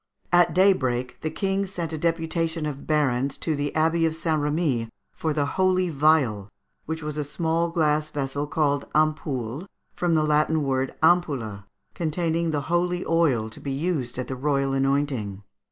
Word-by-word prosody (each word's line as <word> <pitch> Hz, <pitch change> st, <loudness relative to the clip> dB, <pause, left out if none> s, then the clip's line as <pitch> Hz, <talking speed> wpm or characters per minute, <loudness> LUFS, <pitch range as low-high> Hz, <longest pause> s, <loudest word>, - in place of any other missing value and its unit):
At 175 Hz, -1 st, +4 dB
daybreak, 130 Hz, -10 st, +2 dB
the 155 Hz, -, -1 dB
King 195 Hz, +2 st, -1 dB
sent 170 Hz, -4 st, -4 dB
a -, -, -2 dB
deputation 165 Hz, 0 st, -1 dB
of 145 Hz, -2 st, -5 dB
barons 140 Hz, -3 st, +1 dB
to 160 Hz, -, -1 dB
the 145 Hz, 0 st, -2 dB
Abbey 165 Hz, +1 st, +3 dB
of 160 Hz, -, -2 dB
St. 160 Hz, -2 st, 0 dB
Remi 145 Hz, -6 st, 0 dB, 0.2 s
for 160 Hz, -, -2 dB
the 145 Hz, -1 st, +1 dB
holy 185 Hz, +3 st, +1 dB
vial, 135 Hz, -9 st, +2 dB, 0.4 s
which 160 Hz, 0 st, -4 dB
was 150 Hz, 0 st, -4 dB
a 150 Hz, -, 0 dB
small 165 Hz, +3 st, 0 dB
glass 155 Hz, -2 st, +1 dB
vessel 140 Hz, +1 st, -3 dB
called 145 Hz, -2 st, 0 dB
ampoule, 150 Hz, -, 0 dB, 0.3 s
from 175 Hz, -2 st, +1 dB
the 155 Hz, -, +3 dB
Latin 155 Hz, +1 st, +2 dB
word 135 Hz, -1 st, -1 dB
ampulla, 135 Hz, -, +2 dB, 0.3 s
containing 165 Hz, 0 st, -1 dB
the 150 Hz, -2 st, 0 dB
holy 175 Hz, +3 st, 0 dB
oil 150 Hz, -10 st, +2 dB
to -, -, -11 dB
be 140 Hz, -, -4 dB
used 140 Hz, -5 st, -2 dB
at 130 Hz, -, -3 dB
the 130 Hz, -, -4 dB
royal 140 Hz, 0 st, 0 dB
anointing. 135 Hz, -7 st, 0 dB
150 Hz, 165 wpm, -25 LUFS, 135-165 Hz, 0.4 s, At